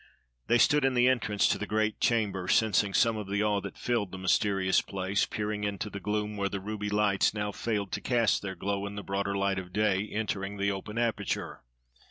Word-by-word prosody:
They 120 - +4
stood 145 +4 +4
in 135 -1 +2
the 120 0 +4
entrance 110 -5 +2
to - - +1
the 105 - -4
great 110 +1 0
chamber, 105 -6 +1
sensing 105 -2 +3
some 115 +2 +3
of 105 -2 -6
the 100 +1 0
awe 105 -1 +1
that 100 - -8
filled 115 -6 -1
the 95 - -6
mysterious 95 0 +2
place, 95 +1 -1
peering 105 0 -3
into 100 +1 -3
the 100 - -5
gloom 105 +2 -2
where 100 -1 0
the 100 - -3
ruby 105 +1 -4
lights 105 -1 +2
now 105 0 -2
failed 105 -2 -2
to - - -3
cast 120 -4 +2
their 95 -1 -5
glow 100 +2 -2
in 100 - -7
the 100 - -5
broader 100 0 -2
light 100 -1 0
of 90 -1 -9
day 105 0 +1
entering 100 -2 -3
the 100 0 +1
open 100 +3 -6
aperture. 115 -4 -2
105 Hz, 215 wpm, -29 LUFS, 100-110 Hz, -, They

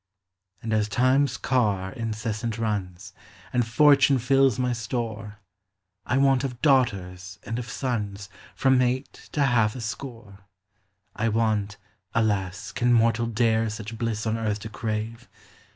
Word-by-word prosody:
And 110 -1 -2
as 105 -1 +1
Time's 130 +3 +2
car 105 -7 0
incessant 110 0 -3
runs, 100 -6 -3 0.4
And 120 -2 +1
Fortune 140 +2 +5
fills 135 0 +3
my 125 -1 0
store, 110 -3 -4 0.7
I 125 - +1
want 135 -1 +3
of 125 -3 -4
daughters 100 -9 +1
and 115 +3 -4
of 120 -2 -6
sons 105 -6 -3 0.3
From 130 -1 +3
eight 130 +2 -1 0.2
to 145 - +2
half 115 -5 +2
a 125 - -6
score. 115 -3 -7 0.8
I 115 +2 0
want 105 -2 0 0.4
(alas! 100 -3 0
can 120 +6 +1
mortal 115 0 +3
dare 115 -1 +1
Such 110 +1 -6
bliss 115 -2 -2
on 110 +1 -1
earth 105 -2 -2
to 110 - -6
crave 110 +2 -4
115 Hz, 135 wpm, -25 LUFS, 105-125 Hz, 0.8 s, Fortune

